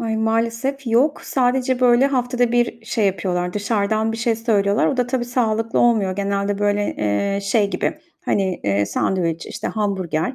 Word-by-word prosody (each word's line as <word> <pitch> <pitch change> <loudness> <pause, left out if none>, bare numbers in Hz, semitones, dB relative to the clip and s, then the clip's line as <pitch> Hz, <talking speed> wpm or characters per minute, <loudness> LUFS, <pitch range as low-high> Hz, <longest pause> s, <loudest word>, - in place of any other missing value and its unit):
Ay, 225 -1 -2
maalesef 230 +5 -1
yok. 250 +6 +2
Sadece, 255 0 0
böyle, 250 +2 +5
haftada 245 -2 0
bir 240 -1 0
şey 220 -2 +1
yapıyorlar, 180 -1 -1
dışarıdan 215 +1 0
bir - - -4
şey 230 -1 0
söylüyorlar. 210 -3 +1
O 270 - 0
da 250 -1 +1
tabii 245 -1 -1
sağlıklı 225 -2 0
olmuyor. 205 -6 +2
Genelde, 200 0 -1
böyle, 205 0 0
eee, 150 - 0
şey 200 0 +1
gibi, 305 - -2 0.3
hani, 190 -3 0
eee, 100 0 +1
sandviç, 165 - -1
işte, - - -5
hamburger 190 - -2
220 Hz, 160 wpm, -20 LUFS, 200-240 Hz, 0.3 s, böyle